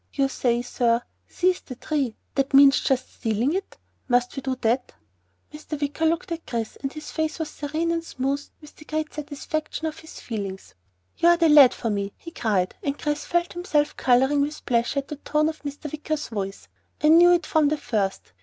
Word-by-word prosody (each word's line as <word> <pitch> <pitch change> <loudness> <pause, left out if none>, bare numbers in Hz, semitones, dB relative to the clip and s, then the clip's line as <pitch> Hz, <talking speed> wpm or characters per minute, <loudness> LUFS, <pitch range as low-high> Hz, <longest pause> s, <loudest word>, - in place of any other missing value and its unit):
"You 275 -1 +1
say, 240 -2 0
sir, 240 -1 +1 0.3
'Seize 365 0 +1
the 255 - -9
Tree.' 270 -3 -2 0.2
That 275 0 +1
means 275 0 +8
just 260 -2 -1
stealing 230 +5 0
it? 385 +1 -4 0.3
Must 245 -1 +1
we 270 - -4
do 265 0 -2
that?" 240 +3 0 0.6
Mr. 300 0 -6
Wicker 295 +3 0
looked 335 +2 -1
at 330 -1 -5
Chris 230 -2 -3
and 275 - -4
his 305 0 -8
face 315 -1 -2
was 320 -2 -4
serene 315 +3 -2
and 335 0 -1
smooth 275 -2 -2 0.2
with 300 -1 -14
the 305 - -15
great 310 0 -3
satisfaction 310 +2 -4
of 315 0 -4
his 320 - -11
feelings. 200 -4 -6 0.4
"You 340 - +5
are 345 - +6
the 335 -2 +4
lad 290 -4 +8
for 230 - -2
me!" 200 -1 -2
he 335 - -10
cried, 200 - 0
and 280 0 -2
Chris 295 0 -2
felt 345 0 0
himself 310 -5 0
coloring 265 +3 +3
with 295 +2 -3
pleasure 235 +3 +1
at 275 - -23
the 300 - -5
tone 300 +1 +1
of 315 - -7
Mr. 290 0 -6
Wicker's 305 0 -3
voice. 195 -3 -5 0.4
"I 305 - +6
knew 345 +2 +8
it 345 - +1
from 310 -2 +3
the 305 +1 +1
first! 210 -8 -2
290 Hz, 200 wpm, -24 LUFS, 245-310 Hz, 0.6 s, means